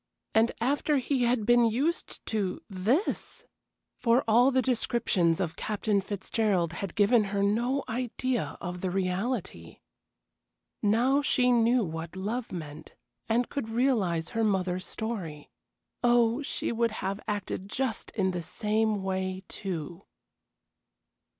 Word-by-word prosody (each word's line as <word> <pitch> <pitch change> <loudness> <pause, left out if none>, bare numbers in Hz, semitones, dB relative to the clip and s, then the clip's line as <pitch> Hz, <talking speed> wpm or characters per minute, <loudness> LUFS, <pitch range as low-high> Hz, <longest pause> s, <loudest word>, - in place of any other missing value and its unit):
And 225 +2 +4
after 285 +4 +1
he 260 -1 +1
had 235 -3 +1
been 240 +1 +5
used 275 +10 -1
to 200 -4 -1
this! 215 - -1 0.5
For 235 +2 +3
all 240 +4 +6
the 260 -1 +2
descriptions 220 -9 +1
of 175 -3 -2
Captain 210 -1 0
Fitzgerald 195 -3 0
had 190 +1 -5
given 215 +1 +4
her 200 0 -1
no 240 +7 +1
idea 250 0 -2
of 180 0 -5
the 185 - -1
reality. 185 - -2 1.0
Now 245 +7 +3
she 250 -3 +3
knew 235 0 +4
what 165 -1 -5
love 220 +6 -3
meant, 155 -3 -8 0.3
and 235 +2 +2
could 275 -6 -4
realize 225 -9 +1
her 225 -1 -1
mother's 185 -3 0
story. 185 -10 -5 0.5
Oh, 240 +1 +4
she 280 - -3
would 230 -1 +1
have 195 +1 -2
acted 200 -1 -3
just 255 -1 -2
in 190 -3 +1
the 180 -1 -3
same 215 +3 0
way, 190 0 -2
too. 175 -2 -5
215 Hz, 130 wpm, -28 LUFS, 185-240 Hz, 1.0 s, all